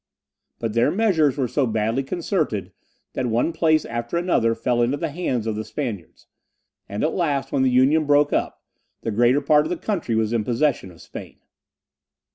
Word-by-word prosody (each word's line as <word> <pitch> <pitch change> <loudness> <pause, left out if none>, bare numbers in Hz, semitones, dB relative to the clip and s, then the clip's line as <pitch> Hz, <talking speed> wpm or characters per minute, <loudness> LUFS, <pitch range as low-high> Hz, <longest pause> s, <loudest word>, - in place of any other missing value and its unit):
But 115 -2 -3
their 115 +1 +3
measures 175 - +2
were 130 -3 0
so 135 +1 0
badly 110 +3 0
concerted, 140 - -2 0.4
that 130 - -2
one 120 +8 0
place 155 -1 +2
after 120 +6 -3
another 145 -10 +1
fell 120 +1 0
into 125 +4 +1
the 165 -1 -3
hands 130 -8 -2
of 110 -1 -2
the 110 - -3
Spaniards; 110 - -6 0.6
and 100 +1 -3
at 155 - +1
last, 145 -6 -1
when 140 - +1
the 130 - +3
Union 135 +5 +3
broke 145 0 +3
up, - - -2 0.4
the 115 - -3
greater 120 +6 +3
part 150 +1 +3
of - - -7
the 180 - -2
country 170 - -2
was 110 0 0
in 115 - +1
the - - -7
possession 125 -4 0
of 85 -2 -15
Spain. - - -10
130 Hz, 190 wpm, -22 LUFS, 115-155 Hz, 0.6 s, their